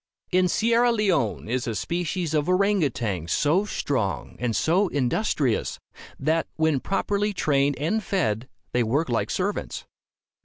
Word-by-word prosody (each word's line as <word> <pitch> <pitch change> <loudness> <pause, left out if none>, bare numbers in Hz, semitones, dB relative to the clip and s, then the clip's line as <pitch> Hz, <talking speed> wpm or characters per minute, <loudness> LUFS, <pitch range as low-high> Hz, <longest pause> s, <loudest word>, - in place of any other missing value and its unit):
In 185 0 +4
Sierra 235 +5 +3
Leone 180 - 0
is 125 +3 -1
a 115 - -2
species 175 - -2
of 150 +1 +1
orang 200 +2 +3
outang 105 - -2
so 160 - +2
strong 130 - -2
and 120 -2 -1
so 185 +5 +2
industrious, 140 - 0 0.4
that, 160 +3 +1
when 160 -3 +2
properly 205 +5 -1
trained 140 -5 +1
and 195 +10 0
fed, 125 - -1 0.2
they 125 - +1
work 130 +7 0
like 115 -2 0
servants. 200 +2 -2
160 Hz, 140 wpm, -25 LUFS, 125-195 Hz, 0.4 s, In